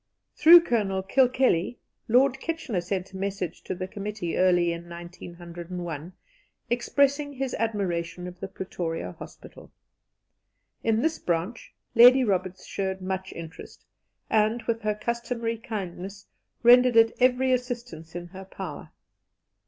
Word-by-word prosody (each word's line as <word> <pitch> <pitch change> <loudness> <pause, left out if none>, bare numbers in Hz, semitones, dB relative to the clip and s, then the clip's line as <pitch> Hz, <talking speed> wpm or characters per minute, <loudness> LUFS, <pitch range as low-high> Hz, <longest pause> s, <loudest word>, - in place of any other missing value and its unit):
Through 335 +3 +9
Colonel 205 - 0
Kilkelly, 250 -3 +2 0.3
Lord 260 +3 +3
Kitchener 280 - -3
sent 185 +1 -4
a - - -6
message 195 -3 -4
to 185 - -3
the 185 +1 -5
committee 200 -3 -4
early 175 -2 +3
in 170 +1 -9
1901, 175 -1 -8 0.6
expressing 280 +4 +1
his 265 -1 -3
admiration 180 -6 -2
of 180 0 -9
the 195 - -5
Pretoria 165 - -5
Hospital. - - -13 1.1
In 225 +1 +1
this 320 0 0
branch 175 +7 -3 0.2
Lady 250 +3 +8
Roberts 185 -4 -1
showed 190 -1 -3
much 190 0 -4
interest, 165 0 -10 0.4
and, 220 +2 +1
with 230 0 -2
her 210 0 0
customary 235 0 -3
kindness, 195 -4 -6 0.4
rendered 245 0 +7
it 225 0 +6
every 255 +1 +3
assistance 240 -10 -4
in 175 0 -6
her 190 +1 -10
power. 190 - -8
200 Hz, 125 wpm, -26 LUFS, 180-240 Hz, 1.1 s, Through